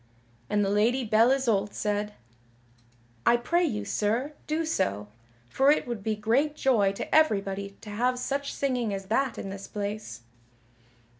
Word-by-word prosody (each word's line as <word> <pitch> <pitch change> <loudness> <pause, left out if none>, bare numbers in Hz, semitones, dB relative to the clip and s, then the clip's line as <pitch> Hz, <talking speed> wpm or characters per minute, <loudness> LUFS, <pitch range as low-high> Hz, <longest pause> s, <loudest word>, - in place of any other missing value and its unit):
And 205 -1 +2
the 195 - 0
Lady 230 +6 +2
Belle 225 +1 +4
Isoult 230 -7 +1
said: 210 0 -2 1.1
"I 240 - +5
pray 340 +9 +1
you, 210 -10 -1
sir, 230 +9 -1
do 315 +2 0
so, 105 - -1 0.4
for 270 - +3
it 300 - +3
would 235 -4 -4
be 215 +1 -1
great 245 +8 +1
joy 225 -9 +3
to - - -6
everybody 200 -9 +1
to 210 - -9
have 250 +4 0
such 275 +3 -2
singing 250 -7 -1
as 195 0 -6
that 270 -1 +1
in 195 - -5
this 195 0 -8
place." 205 - -5
220 Hz, 155 wpm, -27 LUFS, 205-265 Hz, 1.1 s, I